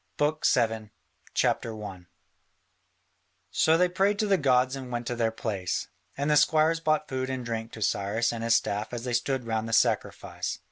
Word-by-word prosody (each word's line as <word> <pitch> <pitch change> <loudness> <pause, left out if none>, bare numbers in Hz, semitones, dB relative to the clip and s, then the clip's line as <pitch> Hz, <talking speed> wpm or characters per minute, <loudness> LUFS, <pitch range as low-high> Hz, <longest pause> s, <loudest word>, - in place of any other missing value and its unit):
BOOK 150 +1 +1
VII 110 -2 +1 0.5
[C.1] 105 -6 -2 1.4
So 160 +1 +4
they 180 +1 +4
prayed 195 +3 +1
to 215 - +1
the 200 -1 +3
gods 130 -2 +3
and 130 -2 -7
went 120 0 -3
to 120 - -2
their 115 -1 +1
place, 105 -5 -3 0.3
and 140 +1 -1
the 150 - +5
squires 155 +2 +4
brought 155 -2 +1
food 130 0 -3
and 130 -2 -3
drink 115 -1 -4
to 110 - -4
Cyrus 105 +4 0
and 115 -1 -4
his 115 0 +4
staff 105 +1 -1
as 120 -1 -4
they 125 -1 -3
stood 125 +1 0
round 110 0 -2
the - - -4
sacrifice. 110 - 0
120 Hz, 180 wpm, -27 LUFS, 110-145 Hz, 1.4 s, the